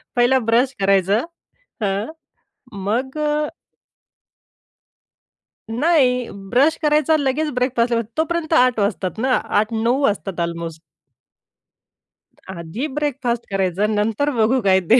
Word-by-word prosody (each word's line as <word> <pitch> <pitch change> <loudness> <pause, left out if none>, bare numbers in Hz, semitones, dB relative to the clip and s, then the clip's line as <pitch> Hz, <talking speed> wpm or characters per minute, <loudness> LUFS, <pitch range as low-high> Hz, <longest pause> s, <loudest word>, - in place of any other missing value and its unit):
पहिला 245 +2 +4
ब्रश 240 +3 +2
करायचं, 195 - +2 0.6
हं, 200 +6 -1 0.6
मग 230 +9 -2 2.5
नाही, 250 -1 +2 0.2
ब्रश 285 +6 +4
करायचा 305 +1 +3
लगेच 290 +2 0
ब्रेकफास्टला, 245 -2 +1 0.2
तोपर्यंत 325 0 -1
8 250 -5 +4
वाजतात 200 -2 -1
ना, 255 +2 +1 0.3
8-9 230 +4 0
वाजतात. 195 -6 -1
अल्मोस्ट. 170 -1 -4 1.7
आधी 185 - -5
ब्रेकफास्ट 255 -5 -1
करायचा, 195 +1 0
नंतर 220 +6 0
बघू 235 +4 +3
काय 190 -2 +4
ते 245 - +8
235 Hz, 95 wpm, -20 LUFS, 200-265 Hz, 2.5 s, ते